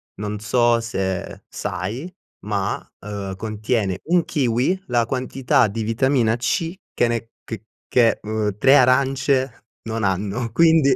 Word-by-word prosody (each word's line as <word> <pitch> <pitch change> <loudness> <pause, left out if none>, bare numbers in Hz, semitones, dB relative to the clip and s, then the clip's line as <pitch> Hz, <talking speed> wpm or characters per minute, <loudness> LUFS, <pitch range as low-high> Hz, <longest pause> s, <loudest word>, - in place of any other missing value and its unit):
non 105 +1 -4
so 120 +2 +3
se 95 -5 -3
sai, 120 - -4 0.3
ma, 100 -2 -1 0.2
uhm, 100 -2 -5
contiene 110 -3 -1
1 175 +1 +2
kiwi, 135 +8 0
la 120 -2 +2
quantità 130 -2 +1
di 110 +2 -3
vitamina 115 0 +2
C, 165 +8 -1 0.2
che 120 - +2
ne 115 -1 -2
che 110 -1 -7 0.2
che 120 -2 +3
uhm, 105 -2 -2
3 135 +6 +6
arance 130 -1 +2 0.2
non 115 -1 -3
hanno. 100 +5 -1
Quindi 160 -1 +5
115 Hz, 130 wpm, -22 LUFS, 105-130 Hz, 0.3 s, 3